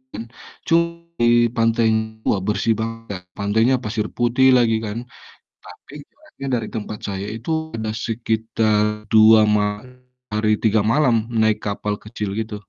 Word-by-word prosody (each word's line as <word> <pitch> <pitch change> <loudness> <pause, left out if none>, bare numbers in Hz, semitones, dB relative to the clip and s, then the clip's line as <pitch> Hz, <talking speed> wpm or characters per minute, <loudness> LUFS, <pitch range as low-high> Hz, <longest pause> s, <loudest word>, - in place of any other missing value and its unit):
kan 115 - -5 0.4
cu 165 - +4 0.4
di 120 0 +4
pantainya 110 -1 +1
wah 100 - +2
bersih 105 +2 +1
banget 115 0 -5
Kak, 90 -2 -6
pantainya 110 +6 +2
pasir 105 0 -2
putih 120 +2 +3
lagi 115 -2 +3
kan, 105 +1 -4 0.7
tapi - - -14 0.2
jaraknya 310 - -11
dari 115 -2 -3
tempat 105 -1 -5
saya 95 0 -4
itu 115 +7 -8 0.3
ada 110 -1 -3
sekitar 110 -1 0 0.3
2 110 0 +7 0.2
ma 105 0 -1 0.5
hari 110 0 +1
3 110 -1 +3
malam 130 -3 +3 0.2
naik 110 -1 +2
kapal 105 0 -2
kecil 105 -2 -5
gitu. 110 -1 -4
110 Hz, 140 wpm, -21 LUFS, 105-115 Hz, 0.7 s, 2